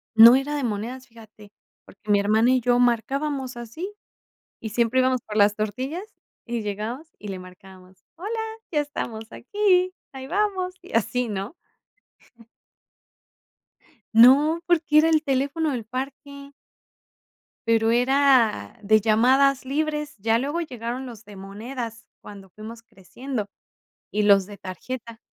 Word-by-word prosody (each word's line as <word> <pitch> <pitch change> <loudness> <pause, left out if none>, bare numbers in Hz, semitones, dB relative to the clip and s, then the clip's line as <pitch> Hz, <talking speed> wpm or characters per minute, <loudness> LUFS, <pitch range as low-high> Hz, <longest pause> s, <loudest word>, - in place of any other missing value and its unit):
no 230 +2 +10
era 285 +2 -3
de 285 - -2
monedas, 240 +4 -4
fíjate, 220 -3 -16 0.3
porque, 205 +2 -17
mi 205 - +5
hermana 220 +4 +3
y 255 -1 +2
yo 245 +1 +2
marcábamos 260 +2 0
así, 275 - -7 0.7
y 220 - -6
siempre 235 +3 +1
íbamos 255 -1 +2
por 210 -1 -6
las 205 0 +4
tortillas, 255 - -3 0.4
y 235 -1 -2
llegábamos 220 +10 -5
y 210 - -9
le 190 - -4
marcábamos: 185 0 -15
"Hola, 430 +6 -4 0.3
ya 300 -3 +2
estamos 230 -6 -6
aquí, 370 - +1 0.2
ahí 265 -1 -8
vamos", 375 0 -1
y 360 - -14
así, 235 +2 -1
¿no? 205 - -5 2.6
No, 280 +8 +6
porque, 320 -3 +2
era 320 +1 +4
el 315 -1 +3
teléfono 285 +3 0
del 240 -5 -4
parque. 280 +3 -7 1.2
Pero, 225 0 +3
era 245 - +3
de 215 +1 +4
llamadas 260 +6 +3
libres, 300 +1 -2
ya 225 +3 +1
luego 290 +6 -2
llegaron 250 -3 -5
los 235 -3 -11
de 210 - -12
monedas 225 +4 -7
cuando 195 -2 -12
fuimos 220 +4 -10
creciendo, 230 +3 -6 0.6
y 210 - 0
los 200 -2 +5
de 205 +1 -11
tarjeta. 225 +5 -8
245 Hz, 135 wpm, -24 LUFS, 215-280 Hz, 2.6 s, no